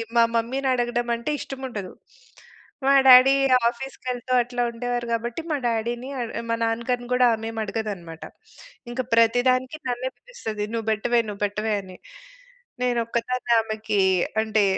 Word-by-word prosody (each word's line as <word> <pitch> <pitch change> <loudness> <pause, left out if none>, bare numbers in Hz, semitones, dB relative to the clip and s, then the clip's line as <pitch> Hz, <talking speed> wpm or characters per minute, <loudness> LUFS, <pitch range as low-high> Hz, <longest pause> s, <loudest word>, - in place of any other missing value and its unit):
మా 235 - +6
మమ్మీనడగడం 240 0 0
అం‌టే 235 +6 -3
ఇష్టముండదు. 255 -8 -6 0.9
మా 275 - +5
డ్యాడీ 255 +1 +9 0.4
ఆఫీస్‌కెళ్తూ 255 0 -6
అట్లా 245 +1 -3
ఉండేవారు 245 +1 -3
గాబట్టి 235 +5 -2
మా 295 - +1
డ్యాడీని 235 +3 -2
అడ్ 235 -2 -3
ఆ - - -3
మా 230 - +2
నాన్న 225 +1 -1
గారిని 245 -1 -1
గూడా 250 0 +5
ఆమేమి 225 0 -5
అడగదనమాట. 195 -7 -5 0.7
ఇంక 255 +2 -2
ప్రతి 230 +1 +4
దానికి 255 +3 0
నన్నే 250 +1 -2
పిలుస్తది. 225 - -6
"నువ్వు 225 -1 -3
బెట్టవే, 235 +3 +1
నువ్వు 200 0 -8
పెట్టవే" 210 +2 -2
అని 185 -1 -12 0.9
నేనొక్కదాన్ని 240 0 0
ఆమెకీ 215 -2 -1 0.4
అంటే 220 -1 +1
235 Hz, 135 wpm, -24 LUFS, 220-250 Hz, 0.9 s, డ్యాడీ